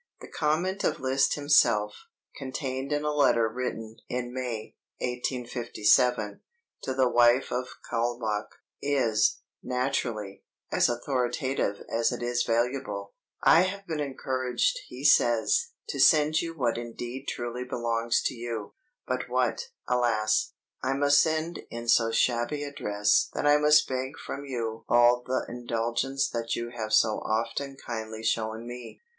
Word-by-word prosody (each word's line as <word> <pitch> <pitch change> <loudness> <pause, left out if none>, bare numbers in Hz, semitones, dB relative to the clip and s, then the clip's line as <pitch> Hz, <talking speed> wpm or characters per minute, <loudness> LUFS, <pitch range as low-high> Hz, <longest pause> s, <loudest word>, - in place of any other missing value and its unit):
The - - -10
comment 170 +6 -1
of - - 0
Liszt 135 +1 +2
himself, 115 -8 +2 0.3
contained 135 0 -4
in 145 0 0
a 150 0 0
letter 120 -6 +3
written 115 -1 -5
in 125 0 -3
May, 125 -4 -5 0.2
1857, 125 -3 0 0.4
to 130 - -3
the 130 -1 +3
wife 120 +1 +4
of 125 0 -3
Kaulbach, 115 -3 -1 0.3
is, 125 -7 +1 0.2
naturally, 120 -6 -2 0.3
as - - +3
authoritative 125 -2 -1
as 115 0 +1
it 120 -1 -4
is 120 0 0
valuable: 120 -4 -1 0.3
"I 165 - +7
have 195 +2 -2
been 160 -4 -3
encouraged," 135 - -1
he - - -9
says, 475 0 +4 0.2
"to - - -4
send 155 0 +5
you 165 -1 -5
what 120 -4 0
indeed 120 +3 -7
truly 120 +1 -4
belongs 115 -2 0
to - - 0
you, 115 -3 -5 0.3
but - - -3
what, 475 - 0 0.2
alas! 115 -3 +1 0.3
I 130 +1 0
must 145 +1 +4
send 160 +1 -1
in 115 0 -7
so 115 -1 +4
shabby 120 +5 +1
a 145 - -5
dress 105 -4 +1
that - - -1
I 145 0 +6
must 150 0 +5
beg 130 +1 -3
from 140 - -6
you 115 -4 -4
all 120 0 +5
the 130 +1 -1
indulgence 120 +3 -1
that 115 -1 -2
you 120 0 -4
have 110 -2 -4
so 110 0 +3
often 115 +5 -2
kindly 110 -3 -6
shown 110 0 -1
me. 120 -1 -9
125 Hz, 140 wpm, -27 LUFS, 115-135 Hz, 0.4 s, I